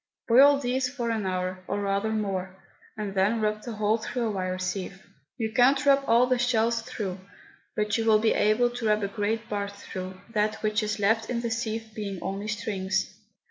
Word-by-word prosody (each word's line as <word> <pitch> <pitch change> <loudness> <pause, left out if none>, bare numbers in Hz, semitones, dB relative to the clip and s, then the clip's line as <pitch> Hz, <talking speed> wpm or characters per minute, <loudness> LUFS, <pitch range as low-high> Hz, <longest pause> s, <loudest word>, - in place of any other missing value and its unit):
Boil 275 +4 +7
these 255 -1 0
for 240 -3 -3
an 215 -4 -1
hour, 185 0 -2
or - - -1
rather 200 +1 0
more, 195 -4 -2 0.4
and 210 -2 -4
then 200 +4 +2
rub 215 0 0
the 235 - -6
whole 215 +1 +1
through 240 +2 -3
a 225 - 0
wire 185 -2 -2
sieve. 185 +1 -4 0.3
You 220 -3 -2
cannot 265 +4 +4
rub 275 0 +5
all 235 +2 +5
the 250 -1 +1
shells 230 -1 +2
through; 210 -6 -5 0.6
but 210 +1 0
you 225 - 0
will 220 -1 +6
be 220 +1 +2
able 240 +3 +3
to 240 -2 -3
rub 210 -1 +2
a - - +1
great 215 +2 -2
part 200 -1 -3
through, 185 -2 -7
that 215 0 +1
which 215 +1 +1
is 210 0 -2
left 220 +2 +1
in 240 -1 -1
the 235 -1 -2
sieve 225 -1 -3
being 205 -3 -4
only 195 +2 -3
strings. 190 -3 -2
215 Hz, 200 wpm, -27 LUFS, 200-235 Hz, 0.6 s, Boil